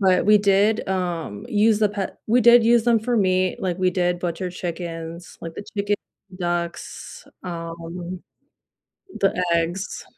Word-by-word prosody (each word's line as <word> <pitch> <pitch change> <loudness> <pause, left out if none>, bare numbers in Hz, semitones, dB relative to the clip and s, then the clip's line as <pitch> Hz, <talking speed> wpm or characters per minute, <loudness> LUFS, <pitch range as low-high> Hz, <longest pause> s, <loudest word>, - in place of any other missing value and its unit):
...but 185 -2 +3
we 210 0 +7
did, 205 +1 +3
um, 175 - -3
use 215 0 +3
the 210 - +3
pet 200 -1 -5
we 240 +3 +3
did 235 +1 +8
use 230 0 +4
them 235 -1 +4
for 240 +2 0
meat, 185 -3 +2
like, 185 -1 -1
we 185 - +3
did 180 -1 0
butcher 175 +1 -3
chickens, 170 -1 -6
like 165 -1 -7
the 205 - -7
chicken, 205 +1 +1 0.4
ducks, 175 -1 -4 0.2
um, 170 +1 -6 1.0
the 190 -2 +2
eggs. 170 +4 -2
185 Hz, 145 wpm, -23 LUFS, 170-205 Hz, 1.0 s, did